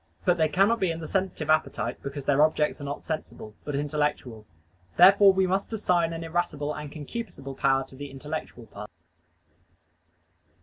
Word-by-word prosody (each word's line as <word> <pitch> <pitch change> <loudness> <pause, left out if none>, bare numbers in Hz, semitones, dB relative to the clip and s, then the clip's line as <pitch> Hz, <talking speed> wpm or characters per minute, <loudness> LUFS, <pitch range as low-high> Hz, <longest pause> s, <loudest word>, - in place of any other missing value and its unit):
But 175 - +3
they 160 -1 +3
cannot 195 +9 +3
be 190 - +1
in 165 0 -3
the 160 - -6
sensitive 185 -5 -1
appetite, 155 0 0
because 140 0 -6
their 145 0 +3
objects 155 -1 +2
are - - -5
not 140 +1 -5
sensible, 155 -8 -6
but 145 - -4
intellectual. 145 -6 -2 0.5
Therefore 195 +2 +8
we 190 0 +2
must 190 +4 -1
assign 175 -6 +1
an 165 0 -5
irascible 160 -3 -2
and 150 -1 -7
concupiscible 150 - -7
power 135 0 +2
to 130 - -16
the 145 +1 -7
intellectual 140 -3 -7
part. 105 -1 -10
155 Hz, 165 wpm, -26 LUFS, 140-175 Hz, 0.5 s, Therefore